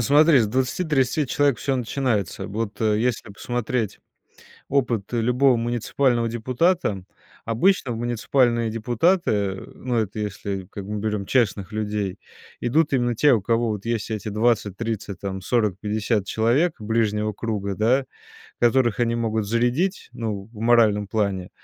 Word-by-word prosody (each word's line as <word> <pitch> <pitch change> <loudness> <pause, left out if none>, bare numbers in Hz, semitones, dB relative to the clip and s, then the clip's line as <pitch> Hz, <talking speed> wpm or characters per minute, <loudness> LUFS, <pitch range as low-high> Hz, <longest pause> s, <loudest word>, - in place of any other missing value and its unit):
Смотри, 145 +5 +5
с 110 - +2
20-30 130 +2 0
человек 140 -3 +1
всё 135 -2 -1
начинается. 120 -6 -1
Вот 105 +1 -4
если 110 +1 0
посмотреть 120 0 -3 0.7
опыт 120 -6 0
любого 125 +3 +3
муниципального 120 +1 0
депутата, 120 - 0 0.4
обычно 120 - +2
в - - -4
муниципальные 120 0 +1
депутаты, 115 - +1 0.2
ну, 125 -2 -3
это 110 -1 -1
если, 100 -2 -4
как 100 - -7
бы 105 - -4
мы 105 - -3
берем 105 -2 -2
честных 105 -5 0
людей, 105 -3 -2 0.4
идут 150 +6 +1
именно 120 -3 +1
те, 145 +5 +5
у 110 -5 +2
кого 115 +2 +1
вот 105 -2 -4
есть 115 -2 -2
эти 110 -1 -3
20-30 105 -1 -1
там, 95 -1 -4
40-50 105 -1 0
человек 125 - +1
ближнего 105 -1 0
круга, 100 -2 -3
да, 125 +6 +2 0.6
которых 120 -1 +3
они 120 -1 +2
могут 110 -2 -1
зарядить, 120 - 0
ну, 105 -3 -4
в 110 - -12
моральном 110 -3 +3
плане, 100 -4 -1
115 Hz, 135 wpm, -23 LUFS, 105-125 Hz, 0.7 s, Смотри